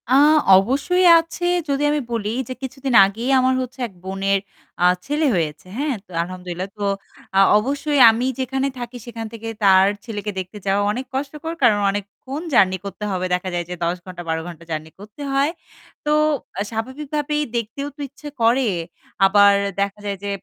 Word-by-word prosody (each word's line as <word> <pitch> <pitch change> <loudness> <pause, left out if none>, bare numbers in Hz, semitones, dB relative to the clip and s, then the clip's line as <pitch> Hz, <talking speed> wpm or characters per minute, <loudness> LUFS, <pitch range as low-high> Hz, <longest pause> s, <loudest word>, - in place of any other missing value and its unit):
আ - - +3 0.4
অবশ্যই 275 - +2
আছে 330 +2 -5 0.2
যদি 280 +1 0
আমি 300 - +1
বলি 220 -3 -1 0.2
যে - - -2
কিছুদিন 265 0 -4
আগেই 225 +6 -3
আমার 255 0 +3
হচ্ছে 255 +1 -7
এক 205 - -19
বোনের 195 +1 0 0.4
আ - - +6 0.2
ছেলে 300 +2 0
হয়েছে। 155 -3 -2
হ্যাঁ? 285 -1 -1
তো - - -54
আলহামদুলিল্লাহ। 180 +1 -6
তো 205 - -2 0.5
আ - - +7 0.2
অবশ্যই 280 +5 0
আমি 225 +3 +1
যেখানে 265 +1 -1
থাকি 240 0 -6
সেখান 230 -2 -6
থেকে 225 0 -7 0.2
তার 190 -1 +6 0.2
ছেলেকে 210 -3 -4
দেখতে 185 +3 -7
যাওয়া 195 +1 +2
অনেক 250 +5 -4
কষ্টকর। 295 +4 -4
কারণ 215 -4 +5
অনেকক্ষণ 205 +8 -6
জার্নি 190 -5 +4
করতে 200 +1 -7
হবে। 185 -1 -1
দেখা 180 +1 -1
যায় 175 -1 -2
যে 180 - -4
১০ 170 +1 0
ঘন্টা 180 -2 -8
১২ 160 0 0
ঘণ্টা 170 -2 -10
জার্নি 155 0 -4
করতে 210 +7 -12
হয়। 275 +3 +2 0.5
তো 295 - +1 0.5
আ - - 0
স্বাভাবিকভাবেই 295 +6 -2
দেখতেও 235 +5 -3
তো - - -25
ইচ্ছা 295 +2 -10
করে। 240 +3 +3 0.6
আবার 200 +1 +6 0.3
দেখা 200 +1 -2
যায় 200 -1 -2
যে 200 - -3
225 Hz, 175 wpm, -21 LUFS, 195-270 Hz, 0.6 s, আ